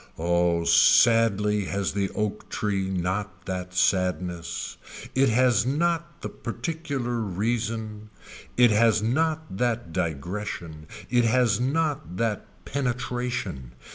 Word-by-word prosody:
Oh 85 0 +1
sadly 105 +3 +4
has 100 0 -2
the 100 -1 0
oak 105 0 -3
tree 100 -2 -1
not 95 0 -3
that 90 -1 -5
sadness. 90 -2 0 0.4
It 135 0 +3
has 120 -2 +3
not 170 +4 -1
the - - -3
particular 130 -1 -4
reason. 110 +1 -2 0.5
It 120 -2 +6
has 110 0 +3
not 155 0 0
that 120 -6 -1
digression. 85 0 -4 0.2
It 120 -1 +4
has 120 -1 +3
not 140 - -1
that 115 -3 -3
penetration. 125 - -3
105 Hz, 110 wpm, -26 LUFS, 90-125 Hz, 0.5 s, It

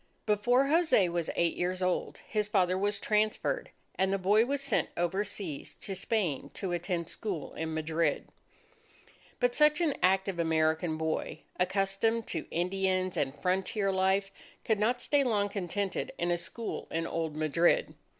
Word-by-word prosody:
Before 240 +5 +3
Jose 310 - +4
was 170 -1 -2
eight 170 -1 +1
years 180 +1 -1
old, 180 -1 -1
his 210 -1 -1
father 185 -3 +2
was 205 +2 0
transferred, 215 +1 0 0.2
and 190 0 +1
the 195 - +2
boy 205 +4 +4
was 280 +1 0
sent 275 0 0
overseas 190 -3 -2
to 195 - -5
Spain 190 - -1
to 190 -3 -3
attend 175 -1 -2
school 190 -8 -4
in 160 0 -4
Madrid. 160 +1 0 1.1
But 245 -1 +2
such 300 +3 +4
an 325 -5 +2
active 190 0 +2
American 160 0 +1
boy, 160 0 -2 0.2
accustomed 195 +5 +1
to 160 - -4
Indians 185 +1 0
and 135 -2 0
frontier 195 +2 +1
life, 190 +1 +1 0.3
could 220 -2 +1
not 245 +4 +1
stay 290 -1 +2
long 210 -5 +1
contented 195 0 -3
in 175 0 0
a 175 - +2
school 230 +6 -5
in 165 +1 -2
old 160 -2 -3
Madrid. 155 +2 +2
190 Hz, 150 wpm, -30 LUFS, 170-210 Hz, 1.1 s, Jose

